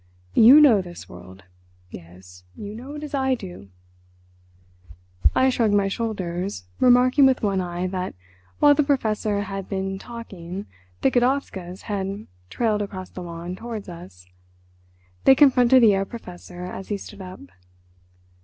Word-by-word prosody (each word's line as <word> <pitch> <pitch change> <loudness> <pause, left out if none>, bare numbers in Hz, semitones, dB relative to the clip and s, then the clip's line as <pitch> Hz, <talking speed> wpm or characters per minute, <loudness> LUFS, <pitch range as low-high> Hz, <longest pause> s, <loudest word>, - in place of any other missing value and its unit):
You 250 +7 +8
know 250 -10 +6
this 175 -1 -10
world. 95 +2 -13 0.5
Yes, 90 +1 -13
you 205 0 -8
know 260 +6 -9
it 300 - -7
as 300 - -8
I 265 -2 +1
do." 180 - -10 1.7
I 260 - +4
shrugged 225 -4 +1
my 200 -1 +2
shoulders, 190 - -4
remarking 255 +3 +5
with 260 -3 +1
one 195 -2 +1
eye 175 0 -4
that 185 - -4 0.4
while 290 -1 +6
the 300 - +2
Professor 220 -7 0
had 195 -1 -6
been 195 -1 -3
talking 195 -5 -8 0.4
the - - +3
Godowskas 240 -8 -1
had 200 0 -4 0.2
trailed 220 -3 0
across 190 -2 -6
the 185 - -8
lawn 170 +1 -7
towards 225 0 -7
us. 165 - -12 1.0
They 265 - +8
confronted 255 -3 +5
the 220 - +7
Herr 195 0 0
Professor 180 -4 -10
as 185 +1 -7
he 205 - -2
stood 200 0 -11
up. 185 0 -10
200 Hz, 145 wpm, -23 LUFS, 180-245 Hz, 1.7 s, You